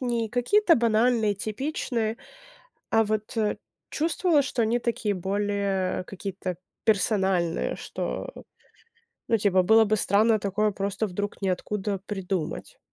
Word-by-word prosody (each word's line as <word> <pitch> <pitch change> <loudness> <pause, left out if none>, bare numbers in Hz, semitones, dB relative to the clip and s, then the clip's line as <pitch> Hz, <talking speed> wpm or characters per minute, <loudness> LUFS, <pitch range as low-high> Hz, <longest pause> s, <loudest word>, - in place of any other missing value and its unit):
не 235 -3 -1
какие-то 330 - +3
банальные, 230 -2 +2
типичные, 225 0 -2 0.7
а 225 0 +4
вот, 215 0 -2
э, 210 -1 +1 0.3
чувствовала, 320 0 +2
что 255 -2 -3
они 225 +2 +2
такие 230 -3 -1
более 195 -1 -1
какие-то 190 -2 -5 0.3
персональные, 195 -5 +1
что, - - -4 1.0
ну, 230 - +3
типа, 195 -3 +3
было 220 +4 +5
бы 215 +1 +2
странно 215 +2 +3
такое 205 +1 0
просто 200 +2 -2
вдруг 205 +2 -4
ниоткуда 195 +1 -2
придумать. 190 -5 -4
210 Hz, 115 wpm, -26 LUFS, 195-230 Hz, 1.0 s, было